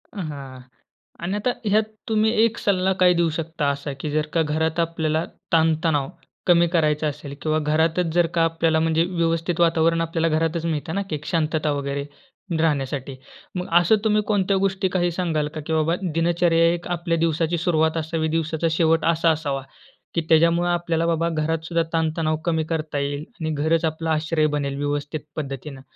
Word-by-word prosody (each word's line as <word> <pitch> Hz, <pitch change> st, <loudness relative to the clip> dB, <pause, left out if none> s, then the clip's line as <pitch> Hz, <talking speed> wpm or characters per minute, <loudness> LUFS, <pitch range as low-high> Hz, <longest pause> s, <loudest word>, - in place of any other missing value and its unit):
अ, 205 Hz, -, -5 dB
हां. 135 Hz, -3 st, -8 dB, 0.6 s
आणि 185 Hz, +4 st, -1 dB
आता 210 Hz, +4 st, 0 dB
ह्यात 210 Hz, +1 st, +3 dB, 0.3 s
तुम्ही 220 Hz, 0 st, +3 dB
एक 230 Hz, -1 st, +1 dB
सल्ला 190 Hz, -1 st, +1 dB
काय 180 Hz, -1 st, +6 dB
देऊ 170 Hz, -1 st, +2 dB
शकता? 160 Hz, -2 st, -2 dB
असा 140 Hz, 0 st, -3 dB
की 150 Hz, -, -3 dB
जर 150 Hz, 0 st, +1 dB
का 165 Hz, -, +3 dB
घरात 160 Hz, +2 st, 0 dB
आपल्याला 160 Hz, -1 st, 0 dB, 0.3 s
ताणतणाव 160 Hz, -3 st, +2 dB, 0.4 s
कमी 170 Hz, -1 st, +5 dB
करायचा 155 Hz, -3 st, +1 dB
असेल 145 Hz, -1 st, -6 dB
किंवा 155 Hz, +1 st, +1 dB
घरातच 160 Hz, +3 st, +1 dB
जर 175 Hz, -1 st, +3 dB
का 165 Hz, -, +3 dB
आपल्याला 165 Hz, -1 st, +1 dB
म्हणजे 160 Hz, 0 st, +2 dB
व्यवस्थित 165 Hz, -1 st, -1 dB
वातावरण 165 Hz, 0 st, +3 dB
आपल्याला 165 Hz, 0 st, 0 dB
घरातच 165 Hz, +1 st, -1 dB
मिळतं 160 Hz, 0 st, -2 dB
ना, 200 Hz, -, 0 dB
की 155 Hz, -, -1 dB
एक 150 Hz, 0 st, -8 dB
शांतता 155 Hz, -1 st, 0 dB
वगैरे, 140 Hz, 0 st, -2 dB, 0.6 s
राहण्यासाठी. 140 Hz, -3 st, -1 dB, 0.4 s
मग 180 Hz, 0 st, -3 dB
असं 175 Hz, +5 st, +4 dB
तुम्ही 215 Hz, -1 st, +3 dB
कोणत्या 195 Hz, -2 st, +2 dB
गोष्टी 190 Hz, -1 st, +1 dB
काही 175 Hz, -1 st, +2 dB
सांगाल 165 Hz, -4 st, -1 dB
का? 155 Hz, -, -4 dB
की 160 Hz, -, -2 dB
बाबा 160 Hz, +1 st, +2 dB, 0.2 s
दिनचर्या 165 Hz, 0 st, +3 dB
एक 175 Hz, 0 st, -5 dB
आपल्या 170 Hz, 0 st, -1 dB
दिवसाची 165 Hz, +1 st, +1 dB
सुरुवात 160 Hz, -1 st, +1 dB
असावी, 160 Hz, 0 st, -1 dB
दिवसाचा 160 Hz, 0 st, -1 dB
शेवट 165 Hz, 0 st, +2 dB
असा 165 Hz, 0 st, +2 dB
असावा, 145 Hz, -3 st, -2 dB, 0.5 s
की 170 Hz, -, +2 dB
त्याच्यामुळं 170 Hz, +2 st, +4 dB
आपल्याला 170 Hz, -1 st, 0 dB
बाबा 165 Hz, 0 st, +1 dB
घरात 160 Hz, 0 st, -1 dB
सुद्धा 170 Hz, 0 st, +1 dB
ताणतणाव 160 Hz, -1 st, 0 dB
कमी 160 Hz, -2 st, +1 dB
करता 155 Hz, -3 st, -2 dB
येईल 140 Hz, +1 st, -2 dB, 0.2 s
आणि 160 Hz, -1 st, -2 dB
घरंच 160 Hz, +2 st, +1 dB
आपला 160 Hz, 0 st, -2 dB
आश्रय 155 Hz, 0 st, +1 dB
बनेल 140 Hz, -1 st, -2 dB
व्यवस्थित 145 Hz, +2 st, -2 dB, 0.2 s
पद्धतीनं. 140 Hz, -1 st, -6 dB
160 Hz, 175 wpm, -23 LUFS, 155-170 Hz, 0.6 s, काय